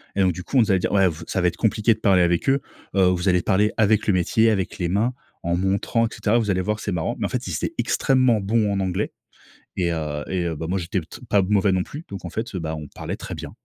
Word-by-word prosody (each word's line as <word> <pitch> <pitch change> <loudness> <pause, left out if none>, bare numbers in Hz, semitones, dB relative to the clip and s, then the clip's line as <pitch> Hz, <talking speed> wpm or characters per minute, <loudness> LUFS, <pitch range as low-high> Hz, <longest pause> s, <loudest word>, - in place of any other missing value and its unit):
et 100 - +2
donc 95 -2 +3
du 90 - -7
coup, 135 - -1
on - - +7
nous 110 -3 +3
a - - +4
dit: 90 - 0
«Ouais, 95 -2 +4
vous 80 -2 -4
ça - - -1
va 90 - +3
être - - -1
compliqué 110 0 +2
de 110 - -12
parler 95 -4 +4
avec 85 +7 +2
eux. 135 +1 +3 0.4
Heu, 95 - +5
vous 90 +1 +2
allez 90 -1 +3
parler 100 +4 +2
avec 110 -1 +3
le 105 - +4
métier, 110 +5 +3
avec 95 -4 -2
les 85 -2 -1
mains, 110 +7 +1 0.3
en 85 0 0
montrant 95 +5 +1
et - - -2
cetera, 110 +2 +1
vous 110 -4 +1
allez 95 - +1
voir 105 +3 -1
que - - -9
c'est 105 - -2
marrant». 85 -3 -1
Mais - - 0
en - - -2
fait, - - -3
ils - - -3
étaient - - -2
extrêmement 130 -5 +2
bons 105 +1 +1
en 100 - 0
anglais 95 -1 -2 0.7
et 85 -2 +1
heu 75 -2 -3
et 90 -2 -1
heu, 85 -1 -1
ben 80 - -4
moi, 95 +2 0
j'étais 90 +2 -2
p 80 - -13
t - - -11
pas 100 - +5
mauvais 100 0 +2
non 95 0 +1
plus. 150 +3 -9
Donc 100 -2 -8
en - - -6
fait, 110 +4 -4
bah, 80 -3 -3
on 75 -1 -7
parlait - - -5
très - - -7
bien. - - -7
95 Hz, 300 wpm, -23 LUFS, 90-105 Hz, 0.7 s, on